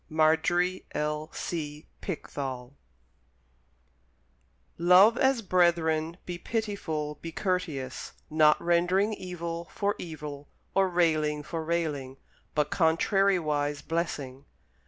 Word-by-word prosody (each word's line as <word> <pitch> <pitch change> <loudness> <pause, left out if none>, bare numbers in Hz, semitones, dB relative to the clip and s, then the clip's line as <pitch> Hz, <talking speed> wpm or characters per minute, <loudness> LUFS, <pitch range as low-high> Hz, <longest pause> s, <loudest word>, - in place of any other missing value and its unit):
Marjorie 165 +4 +2
L. 150 +1 -2
C. 150 -3 -5 0.2
Pickthall 135 -7 -5 2.1
Love 180 +6 +7
as 265 -2 +2
brethren, 170 -3 +2
be 175 -1 -5
pitiful, 165 -11 -3
be 165 - -6
courteous: 160 -9 -3
not 155 -1 +4
rendering 180 +5 +2
evil 170 -3 -5
for 205 0 0
evil 150 -4 -7 0.3
or 195 -1 +3
railing 155 -4 +1
for 165 +1 -4
railing: 150 -5 -2 0.4
but 150 -1 +1
contrariwise 160 -4 +2
blessing. 145 -5 -3
165 Hz, 95 wpm, -28 LUFS, 150-180 Hz, 2.1 s, Love